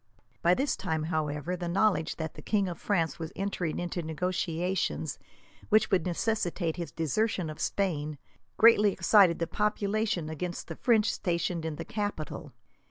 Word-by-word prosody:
By 175 +1 +4
this 275 +6 0
time, 160 -4 -2
however, 150 +2 -1
the 175 -1 -4
knowledge 190 -2 +2
that 160 -1 -4
the - - -10
king 200 -3 +1
of 175 - -5
France 165 -8 0
was 160 -1 -5
entering 190 -4 -2
into 175 0 -3
negotiations, 175 +2 -2 0.5
which 220 0 +4
would 185 -2 +2
necessitate 175 -3 -1
his 170 -1 -4
desertion 165 - 0
of 155 - -9
Spain, 155 -7 -1 0.4
greatly 215 -2 +6
excited 185 -2 +5
the 170 - 0
population 210 -3 0
against 170 +3 -4
the 165 - -5
French 225 +1 +3
stationed 170 -1 -1
in 160 -2 -3
the - - -6
capital. 205 -7 -4
175 Hz, 155 wpm, -29 LUFS, 160-205 Hz, 0.5 s, greatly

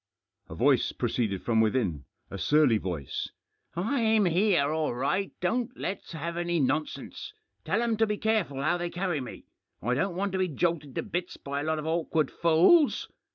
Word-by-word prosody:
A - - -7
voice - - +3
proceeded 100 -6 -1
from 115 -2 +3
within 105 - 0
— - - -40
a 100 - -5
surly 145 - +4
voice: 85 -8 -4 0.2
— - - -50
" - - -39
I'm 220 +2 +2
here 175 -4 +3
all 155 -5 -1
right; 180 +10 0
don't 240 +7 -1
let's 190 -1 -5
have 170 +2 -4
any 175 -1 0
nonsense. 150 - -2 0.3
Tell 235 - +1
'em 230 -2 0
to 225 0 +3
be 210 0 -1
careful 200 -12 0
how 175 +4 +1
they 175 0 -2
carry 175 -4 -2
me; 125 - -9 0.3
I 120 +3 -1
don't 175 +7 0
want 200 +2 -1
to 190 - -2
be 185 - +2
jolted 150 -3 -1
to - - -1
bits 175 +1 -4
by 140 0 -4
a - - -4
lot 160 0 0
of 155 - -4
awkward 160 -2 0
fools. 170 - +4
170 Hz, 195 wpm, -28 LUFS, 140-190 Hz, 0.3 s, surly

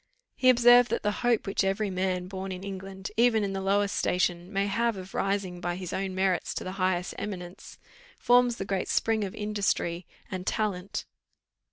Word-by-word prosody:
He 255 - +4
observed, 245 -1 +7
that 235 - -1
the 210 - +2
hope 240 -3 +2
which 195 0 0
every 195 +1 0
man 185 -1 -1
born 190 0 -5
in 185 0 -6
England, 195 0 -7
even 230 -2 +4
in 195 -1 -2
the 195 - -3
lowest 200 +1 +1
station, 180 0 0
may 195 -1 +1
have 230 +2 0
of 185 0 -9
rising 195 -3 -1
by 175 -1 -2
his 180 -1 -6
own 190 -1 -2
merits 190 -2 0
to - - -3
the 185 - -5
highest 180 -1 0
eminence, 180 -3 -7 0.4
forms 245 -1 +4
the 195 - -5
great 195 -1 -2
spring 220 -1 +1
of 190 - -5
industry 200 -4 -1 0.2
and 185 0 -5
talent. 200 -3 -2
195 Hz, 185 wpm, -28 LUFS, 185-210 Hz, 0.4 s, observed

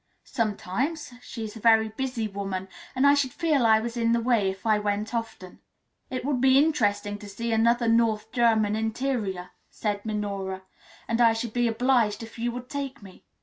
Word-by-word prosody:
"Sometimes. 235 - -2
She 235 -2 -7
is 215 0 -7
a - - -8
very 220 0 +4
busy 240 -1 -3
woman, 195 -2 -5 0.3
and 260 +2 +2
I 280 - +7
should 285 -3 +1
feel 305 -8 +2
I 220 -1 +5
was 235 +1 -4
in 230 -1 +1
the 235 - +2
way 230 -4 +2
if 190 +3 -7
I 215 -1 +3
went 210 +2 -2
often." 225 -6 -5 0.5
"It 255 -1 -4
would 275 -3 0
be 265 0 +5
interesting 205 -9 +1
to 205 -1 -10
see 230 +4 -4
another 235 +1 +3
North 225 -1 +2
German 220 -3 +2
interior," 220 -5 -2 0.2
said 205 -2 -3
Minora; 200 -3 -3 0.4
"and 230 +1 0
I 230 -1 +6
should 225 0 -4
be 240 -1 +2
obliged 230 -2 +1
if 225 +1 -11
you 240 +1 -1
would 245 +1 -7
take 275 -3 -5
me. 190 -2 -15
225 Hz, 190 wpm, -26 LUFS, 210-245 Hz, 0.5 s, I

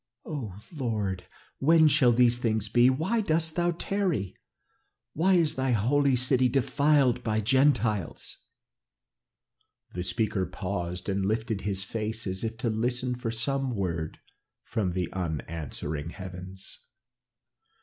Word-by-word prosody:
Oh, 115 - -5 0.2
Lord! 105 -9 -2 0.3
when 160 +2 +5
shall 130 -4 +5
these 120 0 +4
things 110 -3 0
be? 120 +3 +5
'Why 160 - +1
dost 160 -4 +1
thou 175 0 +2
tarry? 175 - -1 0.8
Why 185 +5 +3
is 160 -3 +3
thy 130 -2 0
holy 135 +5 +3
city 130 0 +3
defiled 135 -1 +2
by 110 -2 0
the 110 - -1
Gentiles?'" 115 - +1 1.6
The 90 - -3
speaker 100 0 -1
paused 90 -2 -4
and 100 -1 0
lifted 110 +1 -1
his 95 -2 -2
face 110 +3 -3
as 95 +1 -3
if 115 0 -3
to 115 +1 -1
listen 125 +3 -1
for 125 -1 -4
some 130 +2 -1
word 85 -5 -3 0.5
from 95 -5 -2
the 90 -1 -1
unanswering 80 -3 -4
heavens. 95 +1 -9
115 Hz, 130 wpm, -28 LUFS, 95-135 Hz, 1.6 s, when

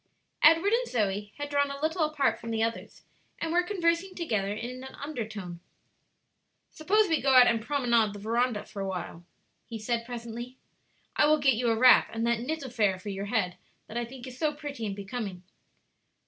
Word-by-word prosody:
Edward 330 +7 +6
and - - +1
Zoe 205 -2 -1
had 290 0 -4
drawn 285 0 +2
a 280 0 -6
little 320 +3 0
apart 280 -7 +1
from 230 - -7
the 225 -1 0
others, 230 0 -4 0.4
and 330 - -2
were 350 +1 +4
conversing 355 0 0
together 220 - -1
in 245 +4 -5
an 265 - -9
undertone. 215 - -6 1.1
"Suppose 410 +7 +2
we 325 -3 +1
go 270 -1 +3
out 250 -1 +9
and 230 -2 +2
promenade 235 -5 +1
the 205 - -8
veranda 230 +1 0
for 205 -2 -7
a 195 - -2
little," 175 -1 -6 0.4
he 230 - -6
said, 230 +2 -2
presently. 240 +1 -7 0.6
"I 295 - +4
will 305 0 +5
get 280 -3 +3
you 235 +1 0
a 225 - +3
wrap 250 +2 +6
and 225 +1 -2
that 235 -1 +1
knit 305 +5 -3
affair 215 -7 +1
for 185 +3 -8
your 195 0 -4
head 200 -5 -1 0.3
that 215 - -11
I 240 - 0
think 245 +1 -9
so 300 +4 -1
pretty 285 -6 -5
and 200 - -4
becoming." 200 -3 -6
240 Hz, 190 wpm, -28 LUFS, 215-290 Hz, 1.1 s, out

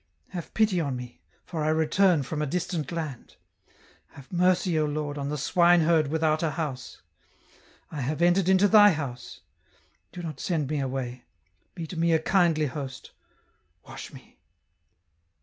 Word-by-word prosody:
Have 175 -3 -8
pity 210 -5 +2
on 140 -4 -2
me, 125 -1 -9 0.2
for 160 -3 -4
I - - 0
return 160 +1 +3
from 150 +3 -4
a 150 - -1
distant 170 -1 -3
land. 155 -7 -6 0.8
Have 140 -2 -14
mercy, 180 -1 +2
O 155 - +2
Lord, 145 -1 -3
on 140 -1 -4
the 150 - -2
swine 175 +4 +4
herd 160 -2 +3
without 155 +1 +1
a 165 - +1
house. 150 -6 -5 0.9
I 150 - -5
have 145 +5 -2
entered 175 +2 +3
into 190 +2 +5
Thy 205 -1 +7
house; 125 -5 -6 0.7
do 175 - -8
not 155 -5 -6
send 155 -5 -2
me 150 - 0
away, 130 -2 -4 0.5
be 170 - -5
to 165 +1 -7
me 170 0 +3
a 160 - +4
kindly 165 -2 +2
host, 135 -1 -6 0.8
wash - - -9
me." - - -16
155 Hz, 160 wpm, -26 LUFS, 140-175 Hz, 0.9 s, Thy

